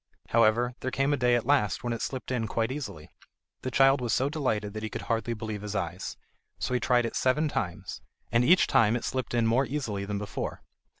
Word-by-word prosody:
However, 115 +2 +3
there 130 - -2
came 135 +2 +1
a - - +4
day 125 -3 +3
at 120 - 0
last 110 -8 +2
when 120 -1 -1
it 115 - -4
slipped 130 -1 -4
in 115 -3 0
quite 115 +2 -1
easily. 125 - -6 0.5
The 130 - -3
child 135 +1 +4
was 120 -4 0
so 135 +2 +2
delighted 110 -9 -1
that 110 - -5
he 110 - -3
could - - -6
hardly 115 +1 -1
believe 110 -2 -5
his 105 0 -5
eyes, 90 -5 -3 0.4
so - - -2
he 125 - +2
tried 120 0 +2
it 115 - -4
seven 140 +5 +2
times, 90 - -4 0.3
and 120 +1 +4
each 175 +8 +6
time 115 0 +4
it 120 - -3
slipped 130 -1 -2
in 120 -1 +3
more 120 +4 +2
easily 115 -9 -3
than 100 0 -3
before. 100 -1 -5
120 Hz, 225 wpm, -28 LUFS, 110-130 Hz, 0.5 s, each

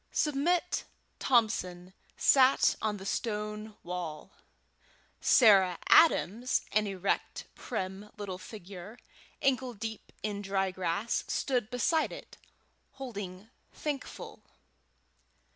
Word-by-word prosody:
Submit 330 +5 +1 0.3
Thompson 190 -7 +1 0.2
sat 265 -1 +5
on 215 -1 -1
the 190 - -9
stone 210 0 -3
wall; 175 -1 -5 0.9
Sarah 195 -8 +6
Adams, 245 - +4
an 215 0 +2
erect, 195 0 -2
prim 195 -2 -5
little 195 -3 -5
figure, 195 +1 -10 0.5
ankle 260 -2 +1
deep 220 0 -6
in 205 -1 -2
dry 195 -1 0
grass, 185 +4 -1
stood 245 -5 0
beside 310 +6 +1
it, - - -10 0.6
holding 210 -6 -7 0.2
Thankful. 290 -3 -5
210 Hz, 95 wpm, -30 LUFS, 190-245 Hz, 0.9 s, Sarah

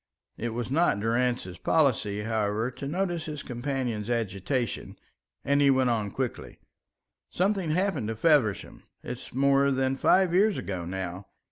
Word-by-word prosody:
It 120 - -3
was 120 +1 -3
not 160 -8 +2
Durrance's 115 -4 -1
policy, 110 -9 +1
however, 110 +1 -1
to 140 +2 -7
notice 175 +1 -2
his 150 -3 -6
companion's 120 -4 -3
agitation, 115 +2 -2 0.5
and 140 +1 +3
he 140 - +5
went 130 -2 +3
on 110 -3 -1
quickly: 130 +4 -4 0.7
"Something 190 -2 0
happened 170 - 0
to 115 - -3
Feversham. 125 - +2 0.2
It's 125 0 -7
more 140 +1 +3
than 135 0 0
five 185 +4 +3
years 200 +2 +3
ago 90 -3 -4
now. 95 +1 -5
125 Hz, 140 wpm, -27 LUFS, 110-145 Hz, 0.7 s, he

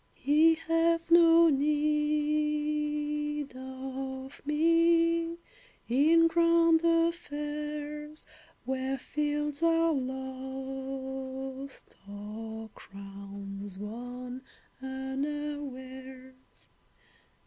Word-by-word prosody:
He 315 +3 +4
hath 330 +1 +1
no 335 0 +7
need 300 0 0
of 265 +1 -6
me 335 +2 +3 0.5
In 315 +7 +5
grand 335 0 +4
affairs, 300 -2 -1 0.4
Where 265 +1 -1
fields 295 +2 -2
are 330 0 +3
lost, 265 0 -5
or 220 +2 -7
crowns 200 0 -9
Won 245 +4 -6 0.4
unawares. 265 -1 -5
290 Hz, 60 wpm, -30 LUFS, 260-305 Hz, 0.5 s, no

